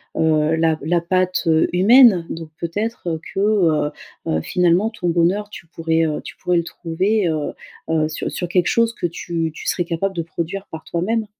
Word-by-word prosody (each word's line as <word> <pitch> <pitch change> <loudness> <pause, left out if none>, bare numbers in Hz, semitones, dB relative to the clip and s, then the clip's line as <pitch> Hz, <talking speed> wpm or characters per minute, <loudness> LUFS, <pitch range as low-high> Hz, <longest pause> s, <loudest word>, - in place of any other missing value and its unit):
heu, 155 0 +2
la 160 -1 +2
la 170 +2 +1
patte, 185 +1 0
heu, 160 0 +4
humaine. 200 -2 +6
Donc 165 -1 -6
peut-être, 205 +4 -3
heu, 160 -1 -2
que, 195 - -2
heu 170 -8 +2 0.4
heu, 80 - 0
finalement 180 - +2
ton 180 -6 -3
bonheur 180 +5 +1
tu 175 - -11
pourrais, 165 0 0
heu, 155 -1 -2
tu - - -9
pourrais 180 -1 0
le 170 - +1
trouver, 185 +5 -1
heu 155 -2 -2 0.4
heu, 155 -1 +2
sur 155 - -4
sur 175 - -3
quelque 180 0 +1
chose 230 0 +2
que 175 - -2
tu 165 -1 -3
tu - - -9
serais 175 - 0
capable 190 +3 -2
de 170 - -1
produire 170 +4 -5
par 160 0 -8
toi-même? 215 +6 -1
170 Hz, 195 wpm, -20 LUFS, 160-195 Hz, 0.4 s, humaine